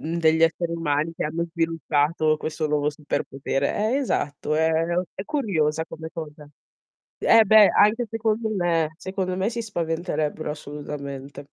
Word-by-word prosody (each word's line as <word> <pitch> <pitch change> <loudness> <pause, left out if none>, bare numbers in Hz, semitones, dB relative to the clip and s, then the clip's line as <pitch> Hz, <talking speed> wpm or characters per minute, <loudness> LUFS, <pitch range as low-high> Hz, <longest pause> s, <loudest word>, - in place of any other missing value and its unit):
mhmm, 165 +2 -3
degli 160 0 +3
esseri 165 +1 +2
umani 155 -1 -1
che - - -3
hanno 165 +2 -2
sviluppato 160 -2 +1
questo 155 0 -3
nuovo 150 0 +1
superpotere. 140 -2 -2 0.2
Eh - - +2
esatto, 150 - -1
è 160 +1 +3 0.4
è 190 - -6
curiosa 160 - 0
come 160 0 -8
cosa. 150 -2 -8 0.7
Eh, 225 -1 +6
beh, 215 0 +7
anche 225 +3 +4
secondo 225 0 0
me, 170 -6 +1
secondo 190 -1 -3
me 190 +3 0
si 235 0 -3
spaventerebbero 165 -5 -2
assolutamente. 145 -2 -7
160 Hz, 140 wpm, -24 LUFS, 150-185 Hz, 0.7 s, beh